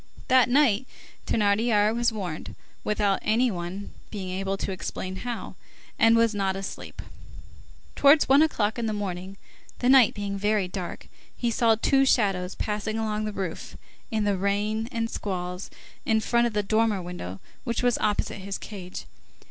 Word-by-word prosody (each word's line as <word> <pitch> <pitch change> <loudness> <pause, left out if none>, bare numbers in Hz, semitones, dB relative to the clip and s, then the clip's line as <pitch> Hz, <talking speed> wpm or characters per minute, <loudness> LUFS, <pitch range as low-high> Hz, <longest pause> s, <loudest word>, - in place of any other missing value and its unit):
That 255 -1 +5
night, 260 -3 +3 0.4
Thénardier 210 0 +2
was 235 0 +2
warned, 185 -8 -5 0.3
without 205 -2 +1
any 235 +3 +2
one 180 +2 -5 0.2
being 190 -3 -5
able 195 +1 -2
to 195 - -3
explain 185 0 -5
how, 240 +2 -5 0.5
and 225 0 +6
was 230 -1 +3
not 195 -2 0
asleep. 195 0 -7 0.9
Towards 285 +2 +6
one 275 +2 +6
o'clock 225 -8 +1
in 230 - -1
the 215 - -1
morning, 190 -2 -4 0.4
the 245 - +1
night 260 -4 +6
being 200 -1 -3
very 205 -1 +1
dark, 180 -1 -6 0.3
he 240 -1 0
saw 225 0 +3
two 270 +5 +3
shadows 195 -8 +1
pass 210 0 -3
along 215 -1 -1
the 215 - -2
roof, 190 -4 -5 0.3
in 220 -1 0
the 205 -2 +1
rain 210 +4 0
and 230 -1 -1
squalls, 180 -3 -4 0.3
in 220 0 +2
front 235 +2 +2
of 235 - -5
the 210 0 0
dormer 215 0 +2
window 175 - -6 0.2
which 235 -1 -2
was 245 -1 +2
opposite 210 -1 0
his 195 +1 -4
cage. 185 -4 -8
210 Hz, 160 wpm, -26 LUFS, 195-230 Hz, 0.9 s, and